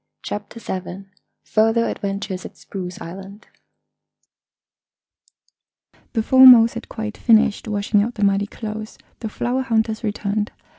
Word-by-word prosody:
CHAPTER 210 +2 -6
SEVEN 190 -1 -7 0.3
FURTHER 225 +1 +2
ADVENTURES 200 -2 -4
AT - - -11
SPRUCE 180 -2 -7
ISLAND 195 +4 -10 2.7
Before 260 +3 +6
Mose 230 -2 +8
had 235 - -8
quite 220 -1 -6
finished 225 -2 +3
washing 205 0 +1
out 235 +4 -3
the 210 - -2
muddy 200 0 +2
clothes 215 0 -7 0.2
the 220 - -5
flower 245 +4 -2
hunters 225 -3 -1
returned. 210 0 -2
215 Hz, 115 wpm, -21 LUFS, 200-230 Hz, 2.7 s, Mose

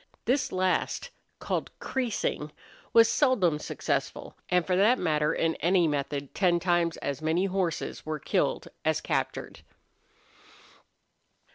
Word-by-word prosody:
This 260 +3 +1
last, 185 - 0 0.3
called - - -2
creasing, 225 - -2 0.4
was 230 -1 +7
seldom 230 - +2
successful, - - -3
and 180 -2 +2
for 185 - +1
that 215 +7 +4
matter 150 -5 +1
in 165 0 +1
any 175 0 +3
method 140 -1 -3
ten 175 -3 +2
times 175 -2 +1
as 140 +1 -3
many 160 +4 +1
horses 185 -4 -2
were 155 0 -3
killed - - -1 0.2
as - - +1
captured. - - -3
175 Hz, 120 wpm, -28 LUFS, 155-195 Hz, 0.4 s, was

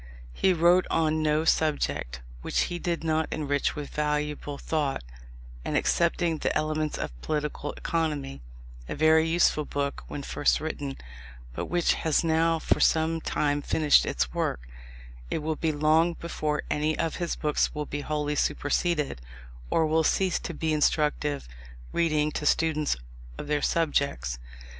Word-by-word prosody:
He 190 - +3
wrote 175 +1 +4
on 155 -1 +1
no 155 +1 +2
subject 145 - 0 0.2
which - - 0
he 175 - -2
did 170 -2 -2
not 160 0 +1
enrich 145 -2 0
with 150 -2 -6
valuable 150 -1 -2
thought, 145 - -1 0.6
and - - 0
excepting 170 -1 +1
the - - 0
Elements 155 0 -1
of - - -3
Political 150 -1 -3
Economy, 150 - -2 0.5
a - - -3
very 160 +1 +4
useful 165 -2 +3
book 140 -1 -3
when 140 - -6
first 145 - +1
written, 145 -3 -4 0.6
but - - -3
which 175 -1 +2
has 160 0 +2
now 165 0 +2
for - - +1
some 160 0 +2
time 145 -1 0
finished 150 0 +4
its 60 -2 -1
work, - - -1 0.7
it 155 - -2
will 160 0 -1
be 160 +1 0
long 155 +3 +3
before 155 -3 -2
any 155 +1 0
of 165 -1 -1
his 175 -2 -2
books 150 0 0
will 150 0 -2
be 145 +1 -4
wholly 150 0 -1
superseded, 150 - 0 0.5
or 160 - +3
will 160 +1 +2
cease 185 +3 +2
to 170 - -6
be 160 0 -1
instructive 150 - +1 0.5
reading 155 -3 +2
to 150 - -2
students 155 -2 +2 0.4
of - - -6
their 145 0 0
subjects. 140 - 0
155 Hz, 150 wpm, -27 LUFS, 145-160 Hz, 0.7 s, wrote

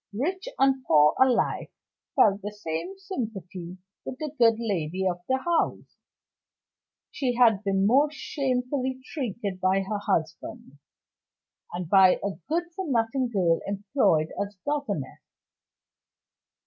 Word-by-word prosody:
Rich 375 - -2
and 270 -1 +3
poor 150 -1 +5
alike 260 -2 +2 0.4
felt 200 -1 +4
the 205 - -5
same 210 - -5
sympathy 195 - -6 0.3
with 255 - -6
the 305 0 -4
good 230 -1 +6
lady 190 -5 -2
of 175 -1 -2
the 260 - +3
house. 335 +4 -1 1.2
She 250 -3 -1
had 225 -4 +4
been 195 -1 +1
most 285 +7 +3
shamefully 260 -1 -2
treated 210 - -4
by 190 +1 +2
her 205 +2 -3
husband, 160 -6 -3 0.9
and 175 -1 -4
by 190 +1 +6
a 200 - -1 0.2
good 335 +3 +1
for 375 -5 -4
nothing 245 +1 +1
girl 180 -7 +2
employed 195 - +1
as 200 -1 -5
governess. 275 - -3
220 Hz, 120 wpm, -26 LUFS, 185-265 Hz, 1.2 s, good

